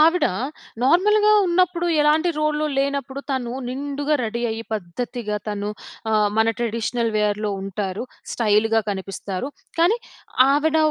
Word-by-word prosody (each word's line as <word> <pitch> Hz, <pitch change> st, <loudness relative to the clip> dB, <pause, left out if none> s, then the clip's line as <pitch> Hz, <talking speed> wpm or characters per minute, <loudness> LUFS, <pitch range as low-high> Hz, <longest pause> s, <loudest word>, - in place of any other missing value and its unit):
ఆవిడ 330 Hz, +3 st, +5 dB, 0.6 s
నార్మల్‌గా 420 Hz, +9 st, +4 dB, 0.2 s
ఉన్నప్పుడు 350 Hz, 0 st, +2 dB
ఎలాంటి 305 Hz, +3 st, +3 dB
రోల్‌లో 305 Hz, 0 st, +1 dB
లేనప్పుడు 275 Hz, -1 st, -1 dB
తను 245 Hz, -3 st, -1 dB, 0.2 s
నిండుగా 285 Hz, +3 st, -1 dB
రెడీ 235 Hz, +1 st, -2 dB
అయ్యి 225 Hz, +1 st, -4 dB
పద్ధతిగా, 210 Hz, +3 st, -3 dB
తను 205 Hz, 0 st, -2 dB, 0.4 s
ఆహ్, 210 Hz, -1 st, +3 dB
మన 220 Hz, 0 st, +4 dB
ట్రెడిషనల్ 230 Hz, 0 st, -1 dB
వేర్‌లో 210 Hz, 0 st, +1 dB
ఉంటారు. 195 Hz, +1 st, -3 dB, 0.3 s
స్టైల్‌గా 225 Hz, 0 st, +3 dB
కనిపిస్తారు. 195 Hz, +3 st, -4 dB, 0.3 s
కానీ 360 Hz, +8 st, +4 dB, 0.5 s
ఆవిడ 300 Hz, +3 st, +2 dB
245 Hz, 115 wpm, -22 LUFS, 210-305 Hz, 0.6 s, ఆవిడ